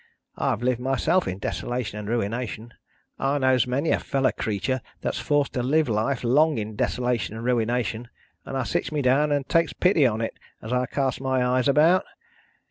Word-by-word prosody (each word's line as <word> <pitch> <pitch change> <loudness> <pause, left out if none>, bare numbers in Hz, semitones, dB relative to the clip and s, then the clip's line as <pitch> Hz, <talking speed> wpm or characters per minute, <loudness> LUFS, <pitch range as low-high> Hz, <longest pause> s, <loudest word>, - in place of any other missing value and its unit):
I've 115 - -1
lived 125 -1 +1
myself 135 +8 +1
in 95 - -3
desolation 110 0 -3
and 105 0 -6
ruination; 115 0 -3 0.5
I 140 +1 +1
knows 130 -3 +3
many 140 +6 0
a - - +2
fellow 135 -2 0
creetur 115 +4 -2 0.2
that's - - -2
forced 145 -1 +1
to 125 - -1
live 150 +5 +2
life 115 +4 0
long 150 +4 +3
in 110 0 -4
desolation 120 -1 -1
and 115 +1 -6
ruination; 120 -1 0 0.4
and 135 - -5
I 130 - 0
sits - - -2
me 150 -2 -1
down 140 +4 +3
and 145 -2 0
takes 165 -1 +2
pity 175 -7 +3
on 110 -2 -2
it, 115 - -4 0.2
as 110 - -5
I 125 0 +1
casts 135 -2 -1
my 130 -1 +1
eyes 125 +2 +2
about. 160 +6 +4
125 Hz, 185 wpm, -25 LUFS, 115-140 Hz, 0.5 s, about